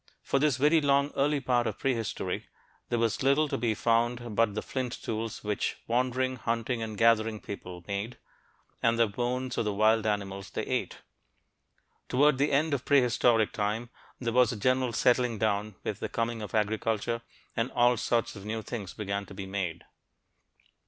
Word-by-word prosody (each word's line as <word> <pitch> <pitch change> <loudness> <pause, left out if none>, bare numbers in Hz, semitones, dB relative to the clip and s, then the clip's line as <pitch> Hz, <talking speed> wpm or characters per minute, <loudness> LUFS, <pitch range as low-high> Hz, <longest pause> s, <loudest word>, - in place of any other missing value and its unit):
For 140 - +1
this 145 -3 +2
very 150 +4 +4
long 140 0 +3
early 145 +1 +2
part 120 -3 +1
of 110 - -3
prehistory, 115 -6 -2 0.4
there 120 - +1
was 115 -2 0
little 140 +3 +3
to - - -2
be 115 -1 0
found 120 0 0
but 115 -2 +2
the 110 - -2
flint 130 -2 -3
tools 110 0 -4
which 105 -1 -1
wandering, 130 +2 0
hunting 115 +1 -1
and 110 -2 -5
gathering 115 -1 +3
people 90 -4 -8
made, 100 +4 -3 0.6
and 115 0 +3
the 115 - +5
bones 125 +4 -2
of - - 0
the 105 - 0
wild 110 +1 +3
animals 100 -2 -2
they - - -3
ate. - - -3 1.1
Toward 140 +1 +4
the 145 +2 +2
end 150 +2 +2
of 140 -2 -1
prehistoric 120 -5 +3
time 110 +3 -2 0.3
there 115 -2 -2
was 125 0 +5
a 115 - -4
general 130 +3 +1
settling 125 -1 +2
down 105 -1 0
with - - -3
the - - -3
coming 115 -1 -2
of 105 0 -5
agriculture, 110 +2 0 0.3
and 115 +2 0
all 120 0 +4
sorts 115 0 0
of 100 - -9
new 110 +1 -4
things 105 -7 -6
began 100 -1 -3
to 95 - -11
be 95 - -5
made. 95 -4 -3
115 Hz, 175 wpm, -29 LUFS, 105-125 Hz, 1.1 s, the